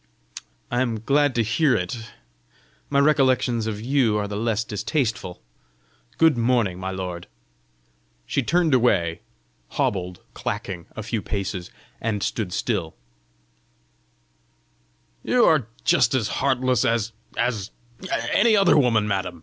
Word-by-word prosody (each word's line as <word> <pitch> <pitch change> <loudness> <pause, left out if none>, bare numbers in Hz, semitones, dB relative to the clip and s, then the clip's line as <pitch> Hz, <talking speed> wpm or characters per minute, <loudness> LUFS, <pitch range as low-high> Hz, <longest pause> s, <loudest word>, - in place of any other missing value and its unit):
"I 120 +1 +1
am 115 -4 -1
glad 145 +2 +2
to 115 - +2
hear 130 +6 +2
it: 110 +6 -4 0.8
my 140 - 0
recollections 130 -5 +3
of 105 -2 -3
you 120 -2 +2
are 105 -1 -1
the 100 - -5
less 110 +1 0
distasteful! 110 - -2 0.7
Good 160 -3 +5
morning, 115 -7 +1
my 95 0 -4
lord!" 90 -2 -5 1.0
She 140 - 0
turned 165 +3 +2
away, 95 -10 +2 0.6
hobbled, 90 -2 -1
clacking, 90 -4 -5
a 110 - -5
few 115 0 -2
paces, 95 -3 -4 0.3
and 105 -3 -1
stood 105 -6 -2
again. 95 -9 -2 2.3
"You 250 -1 +3
are 150 -8 +3 0.2
just - - +3
as 110 -5 0
heartless 130 -2 +1
as 115 -1 0 0.3
as 110 -5 -1 0.6
any 220 +1 +5
other 195 -6 +5
woman, 115 -5 +2
madam! 95 -4 -2
115 Hz, 125 wpm, -23 LUFS, 100-130 Hz, 2.3 s, Good